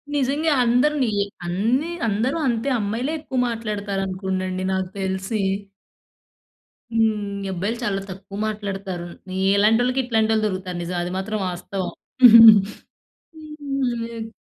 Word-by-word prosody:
నిజంగా 290 Hz, +3 st, +1 dB
అందరు 250 Hz, +6 st, +3 dB
నియి 205 Hz, -4 st, 0 dB, 0.2 s
అన్ని 230 Hz, -, 0 dB, 0.2 s
అందరూ 225 Hz, +9 st, 0 dB
అంతే 235 Hz, +3 st, 0 dB
అమ్మాయిలే 230 Hz, +8 st, -2 dB
ఎక్కువ 275 Hz, -4 st, -3 dB
మాట్లాడతారు 210 Hz, -4 st, -3 dB
అనుకోండండి 185 Hz, 0 st, -3 dB
నాకు 190 Hz, -1 st, -2 dB
తెలిసి. 190 Hz, +2 st, -2 dB, 1.5 s
హ్మ్. 210 Hz, -3 st, 0 dB
అబ్బాయిలు 200 Hz, +6 st, -2 dB
చాలా 195 Hz, -4 st, -1 dB
తక్కువ 195 Hz, +1 st, -9 dB
మాట్లాడుతారు. 195 Hz, -4 st, -5 dB, 0.5 s
ఇలాంటోళ్ళకి 240 Hz, +5 st, +3 dB
ఇట్లాంటోళ్ళు 220 Hz, -2 st, +1 dB
దొరుకుతారు 185 Hz, -2 st, -4 dB
నిజం. 175 Hz, +1 st, -4 dB
అది 175 Hz, -, -4 dB
మాత్రం 215 Hz, +3 st, -3 dB
వాస్తవం. 180 Hz, +1 st, -4 dB, 1.4 s
హ్మ్. 265 Hz, -7 st, -4 dB
215 Hz, 105 wpm, -22 LUFS, 190-245 Hz, 1.5 s, అందరు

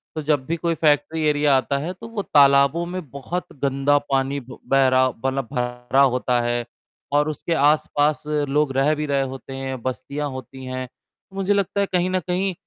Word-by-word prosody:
तो 155 Hz, -, -2 dB
जब 145 Hz, -3 st, 0 dB
भी 165 Hz, -, -1 dB
कोई 170 Hz, 0 st, -1 dB
फैक्ट्री 155 Hz, +1 st, +1 dB
एरिया 145 Hz, -1 st, +3 dB
आता 130 Hz, +2 st, -1 dB
है 160 Hz, +6 st, -3 dB
तो 225 Hz, +5 st, -11 dB
वो 225 Hz, -3 st, -4 dB
तालाबों 140 Hz, +2 st, +4 dB
में 185 Hz, +1 st, -4 dB
बहुत 140 Hz, +7 st, -4 dB, 0.2 s
गंदा 140 Hz, +1 st, +2 dB
पानी 135 Hz, +1 st, +1 dB
बह 135 Hz, +1 st, +1 dB
रहा 130 Hz, 0 st, +4 dB
मतलब 135 Hz, +2 st, -3 dB
भरा 125 Hz, +1 st, 0 dB
होता 125 Hz, -2 st, +2 dB
है 120 Hz, 0 st, -1 dB, 0.5 s
और 150 Hz, +1 st, +3 dB
उसके 155 Hz, +2 st, -3 dB
आसपास 145 Hz, -1 st, +2 dB
लोग 150 Hz, -1 st, +1 dB
रह 145 Hz, +3 st, +3 dB
भी 150 Hz, 0 st, -3 dB
रहे 140 Hz, -1 st, +1 dB
होते 135 Hz, 0 st, -6 dB
हैं, 135 Hz, -2 st, -5 dB
बस्तियाँ 140 Hz, +4 st, -4 dB
होती 130 Hz, 0 st, -9 dB
हैं। 130 Hz, 0 st, -4 dB, 0.5 s
मुझे 195 Hz, +1 st, +1 dB
लगता 200 Hz, 0 st, 0 dB
है 200 Hz, -, +2 dB
कहीं 180 Hz, 0 st, +2 dB
न 185 Hz, 0 st, +1 dB
कहीं 185 Hz, +2 st, -1 dB
140 Hz, 185 wpm, -22 LUFS, 130-155 Hz, 0.5 s, तालाबों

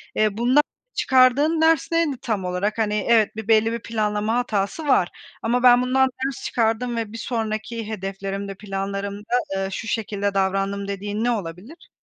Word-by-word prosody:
Eee, 215 Hz, -1 st, +1 dB
bundan 255 Hz, +5 st, +4 dB, 0.3 s
çıkardığın 270 Hz, +5 st, +4 dB
ders 320 Hz, -1 st, +3 dB
neydi 330 Hz, -5 st, +1 dB
tam 205 Hz, -5 st, -2 dB
olarak? 180 Hz, +4 st, -1 dB
Hani, 210 Hz, -1 st, 0 dB
evet, 220 Hz, -3 st, +4 dB
bir 220 Hz, -1 st, -6 dB
belli 225 Hz, 0 st, +4 dB
bir 235 Hz, -, -3 dB
planlama 215 Hz, -1 st, -1 dB
hatası 240 Hz, +5 st, -1 dB
var. 185 Hz, -10 st, +3 dB, 0.3 s
Ama 245 Hz, +2 st, 0 dB
ben 245 Hz, -1 st, +7 dB
bundan 265 Hz, +1 st, +3 dB, 0.2 s
ders 270 Hz, -2 st, -4 dB
çıkardım 235 Hz, +1 st, 0 dB
ve 225 Hz, -2 st, -3 dB
bir -, -, -6 dB
sonraki 225 Hz, -1 st, -3 dB
hedeflerimde, 195 Hz, -1 st, -5 dB
planlarımda, 200 Hz, +2 st, -5 dB, 0.2 s
eee, 195 Hz, 0 st, -1 dB
şu 220 Hz, +3 st, -5 dB
şekilde 205 Hz, -2 st, -2 dB
davrandım 195 Hz, +1 st, 0 dB
dediğin 205 Hz, +2 st, -3 dB
ne 245 Hz, -, +2 dB
olabilir? 205 Hz, -, -6 dB
220 Hz, 160 wpm, -23 LUFS, 200-245 Hz, 0.3 s, ben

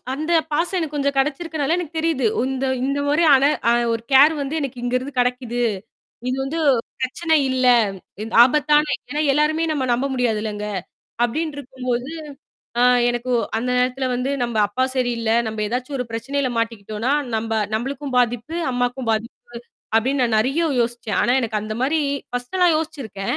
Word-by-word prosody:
அந்த 310 Hz, +4 st, -2 dB, 0.2 s
பாசம் 345 Hz, +5 st, 0 dB
எனக்குக் 305 Hz, -3 st, -3 dB
கொஞ்சம் 280 Hz, 0 st, 0 dB
கிடைச்சிருக்கனால, 300 Hz, +2 st, 0 dB
எனக்குத் 330 Hz, -2 st, -5 dB
தெரியுது. 315 Hz, -7 st, +1 dB, 0.3 s
இந்த, 265 Hz, 0 st, -2 dB, 0.2 s
இந்தமாரியான 285 Hz, +1 st, +3 dB, 0.3 s
அ -, -, +5 dB, 0.2 s
ஒரு 230 Hz, -, -2 dB
கேர் 280 Hz, +4 st, +7 dB
வந்து 275 Hz, +3 st, -4 dB
எனக்கு 260 Hz, -3 st, -4 dB
இங்க 245 Hz, 0 st, -2 dB
இருந்து 260 Hz, +1 st, -7 dB
கிடைக்குது. 245 Hz, -1 st, -1 dB, 0.7 s
இது 255 Hz, -, 0 dB
வந்து 295 Hz, +5 st, -3 dB, 0.4 s
பிரச்சனை 320 Hz, +5 st, +1 dB
இல்ல 260 Hz, 0 st, +1 dB, 0.8 s
ஆபத்தான 295 Hz, +3 st, +3 dB, 0.2 s
ஏன்னா, 295 Hz, -, -1 dB
எல்லாருமே 305 Hz, +3 st, +2 dB
நம்ம 275 Hz, -4 st, -1 dB
நம்ப 255 Hz, +3 st, +1 dB
முடியாதுலங்க. 215 Hz, -4 st, -1 dB, 0.6 s
அப்பிடின்டு 295 Hz, +5 st, -1 dB
இருக்கும்போது, 255 Hz, -1 st, -4 dB, 0.7 s
ஆ -, -, +5 dB, 0.3 s
எனக்கு 240 Hz, +1 st, -2 dB, 0.3 s
அந்த 245 Hz, +3 st, -3 dB
நேரத்துல 255 Hz, +1 st, 0 dB
வந்து 250 Hz, +2 st, -1 dB
நம்ம 235 Hz, -2 st, -4 dB
அப்பா 255 Hz, +6 st, 0 dB
சரியில்ல. 235 Hz, -3 st, 0 dB, 0.2 s
நம்ம 215 Hz, -1 st, -3 dB
எதாச்சும் 255 Hz, +5 st, -3 dB
ஒரு 250 Hz, -, -2 dB
பிரச்சனையில 270 Hz, +3 st, -2 dB
மாட்டிக்கிட்டோன்னா, 225 Hz, +1 st, -2 dB, 0.2 s
நம்ப 225 Hz, 0 st, -2 dB, 0.2 s
நம்மளுக்கும் 270 Hz, +4 st, -3 dB
பாதிப்பு, 245 Hz, +6 st, 0 dB, 0.2 s
அம்மாக்கும் 245 Hz, 0 st, -1 dB
பாதிப்பு 220 Hz, +1 st, -3 dB, 0.6 s
அப்பிடின்னு 260 Hz, +4 st, +1 dB
நான் 230 Hz, -3 st, +2 dB
நிறைய 270 Hz, +9 st, +1 dB, 0.2 s
யோசிச்சேன். 235 Hz, -4 st, -1 dB
ஆனா 245 Hz, -, +2 dB
எனக்கு 220 Hz, -3 st, -2 dB
அந்த 215 Hz, 0 st, -4 dB
மாதிரி 305 Hz, +4 st, +2 dB, 0.3 s
ஃபர்ஸ்டுலாம் 325 Hz, +8 st, +1 dB
யோசிச்சிருக்கேன். 270 Hz, -11 st, -4 dB
255 Hz, 145 wpm, -21 LUFS, 240-290 Hz, 0.8 s, கேர்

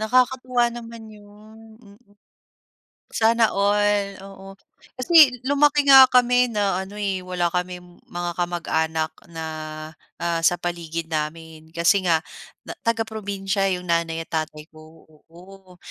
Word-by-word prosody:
Nakakatuwa 250 Hz, +2 st, +1 dB
naman 230 Hz, -1 st, -10 dB
yun. 210 Hz, +1 st, -16 dB, 0.2 s
Mm. 200 Hz, -3 st, -18 dB, 1.2 s
Sana 225 Hz, 0 st, +2 dB
all, 205 Hz, 0 st, +1 dB
oo. 195 Hz, 0 st, -12 dB, 0.4 s
Kasi 280 Hz, -1 st, +6 dB
lumaki 290 Hz, +1 st, +3 dB
nga 265 Hz, -2 st, +9 dB
kami 250 Hz, 0 st, +3 dB
na 205 Hz, -4 st, -1 dB
ano, 190 Hz, +2 st, -9 dB
eh, 200 Hz, -2 st, -2 dB
wala 180 Hz, -2 st, -2 dB
kaming 180 Hz, 0 st, -5 dB
mga 175 Hz, 0 st, -4 dB
kamag-anak 160 Hz, -2 st, -1 dB, 0.2 s
na, 165 Hz, -1 st, -7 dB, 0.7 s
ah, 170 Hz, -1 st, -2 dB
sa 165 Hz, +2 st, +3 dB
paligid 165 Hz, -1 st, -5 dB
namin 160 Hz, +1 st, -5 dB
kasi 175 Hz, +4 st, +3 dB
nga 165 Hz, 0 st, +2 dB, 0.4 s
na -, -, -7 dB
taga-probinsiya 200 Hz, -4 st, -2 dB
iyong 180 Hz, -, -9 dB
nanay 165 Hz, -1 st, -1 dB
at -, -, -36 dB
tatay 155 Hz, -1 st, -4 dB
ko, 155 Hz, +1 st, -17 dB, 0.2 s
oo. 185 Hz, +2 st, -16 dB
195 Hz, 125 wpm, -22 LUFS, 170-225 Hz, 1.2 s, nga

